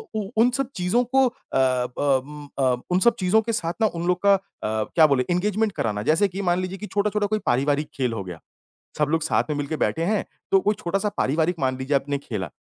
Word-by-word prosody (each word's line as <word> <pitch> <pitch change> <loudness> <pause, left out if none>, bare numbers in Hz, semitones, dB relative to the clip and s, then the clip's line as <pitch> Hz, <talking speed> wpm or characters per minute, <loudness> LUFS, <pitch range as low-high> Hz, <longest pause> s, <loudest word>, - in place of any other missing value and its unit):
उ 210 -3 -2
उन 235 +2 +5
सब 275 0 -1
चीज़ों 185 +7 +1
को 270 0 +6
अ, 240 - -5 0.2
ब 130 +1 +1
उम, 150 0 -10
अ, 130 -2 +3 0.2
उन 180 - +3
सब 235 +4 +4
चीज़ों 190 +4 +3
के 230 +1 -3
साथ 170 -5 -1
ना 220 - +5
उन 170 +1 -3
लोग 180 0 +2
का 200 0 +6
अ, - - -2 0.3
क्या 110 +9 +3
बोले 135 -3 +1
इंगेज़मेंट 210 +4 +1
कराना, 105 - -2
जैसे 160 - +3
कि 195 +1 -5
मान 180 -1 +1
लीजिए 185 +1 -4
कि 210 - -7
छोटा-छोटा 205 +1 0
कोई 215 +1 0
पारिवारिक 145 +4 +1
खेल 125 -3 -1
हो 100 -4 -4
गया, 90 -3 -8 0.6
सब 150 -1 +2
लोग 165 -1 +1
साथ 160 - +1
में 150 - -1
मिलके 145 +2 -3
बैठे 160 - 0
हैं 205 +3 0 0.3
तो 195 - +6
कोई 210 +2 +1
छोटा-सा 195 +3 -1
पारिवारिक 160 +5 +1
मान 130 -1 0
लीजिए 135 +2 0
आपने 140 +1 -1
खेला, 105 -9 -5
165 Hz, 235 wpm, -24 LUFS, 135-200 Hz, 0.6 s, को